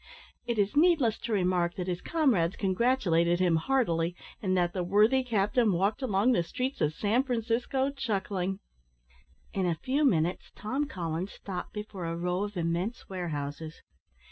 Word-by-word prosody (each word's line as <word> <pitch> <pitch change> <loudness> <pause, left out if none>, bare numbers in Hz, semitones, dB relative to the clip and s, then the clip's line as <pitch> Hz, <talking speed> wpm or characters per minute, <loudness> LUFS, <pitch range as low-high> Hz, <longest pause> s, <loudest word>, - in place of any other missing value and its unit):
It 235 -2 -1
is 205 +3 +1
needless 300 -8 +4
to 235 - -5
remark, 180 -3 +1
that 180 - -3
his 180 -1 -3
comrades 230 - +1
congratulated 185 -5 +2
him 175 -3 +3
heartily, 170 -6 +1 0.3
and 185 -2 +1
that 175 -1 +1
the 185 - -1
worthy 215 +8 +4
captain 215 -1 +2
walked 195 +8 0
along 225 -1 +2
the 205 - +3
streets 255 +10 -3
of 150 +1 +1
San 215 +7 +2
Francisco 250 +2 -1
chuckling. 195 -7 -2 0.9
In 190 -2 0
a 170 - +1
few 265 - 0
minutes, 175 - +1
Tom 265 +7 -2
Collins 175 - -4
stopped 185 -3 -6
before 210 -4 -6
a 165 0 -3
row 180 +2 -1
of 205 -2 -7
immense 175 +7 -2
warehouses. 160 -3 -5
195 Hz, 155 wpm, -29 LUFS, 175-240 Hz, 0.9 s, needless